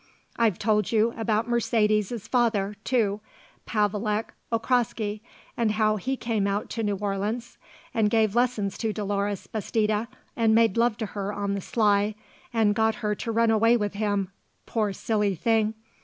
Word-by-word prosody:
I've 225 -6 +2
told 210 -2 +1
you 225 +1 +3
about 225 0 0
Mercedes's 215 -2 +1
father, 215 -5 +1
too, 215 -5 +1 0.5
Pavelek 210 +1 0 0.2
Okraski, 225 -3 0 0.3
and 225 -3 +1
how 215 0 +2
he 265 +6 -2
came 220 -5 -1
out 200 +1 -2
to 230 - -2
New 205 -2 0
Orleans 205 +4 -3 0.3
and 215 -2 +2
gave 220 -2 +2
lessons 235 -5 0
to 220 -2 -1
Dolores 205 -1 -2
Bastida 215 +1 -1 0.3
and 225 -2 +3
made 225 -3 +4
love 230 -1 +2
to 225 - -2
her 200 -1 -4
on 200 -1 -2
the 200 - -2
sly 205 0 +2 0.4
and 220 -3 +3
got 220 0 +2
her 210 - +2
to 230 +2 -4
run 230 0 +3
away 225 +2 +4
with 210 -2 -2
him 205 -2 -1 0.4
poor 215 -3 0
silly 205 0 0
thing. 220 +4 +1
215 Hz, 155 wpm, -26 LUFS, 205-230 Hz, 0.5 s, made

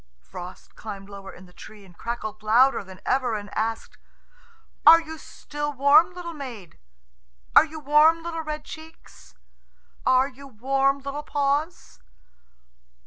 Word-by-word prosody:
Frost 175 - -11
climbed 200 -2 -9
lower 195 -1 -10
in 185 - -14
the 180 - -20
tree, 210 +2 -13
and 180 -2 -18
crackled 215 -1 -5
louder 235 +4 +4
than 190 -1 -13
ever, 250 -4 +1
and 205 -1 -7
asked, 225 +1 -3 0.8
"Are 330 +1 +9
you 320 -1 -9
still 295 -1 -6
warm, 285 +6 +5
little 345 -1 -7
maid? 240 - -9 0.8
Are - - +9
you 315 0 -9
warm, 305 +3 +4
little 330 -1 -4
red 305 -1 -6
cheeks? 315 - -13 0.7
Are 260 +1 +4
you 275 +1 -13
warm, 270 +3 0
little 280 +2 -5
paws?" 290 - -2
270 Hz, 140 wpm, -24 LUFS, 215-300 Hz, 0.8 s, Are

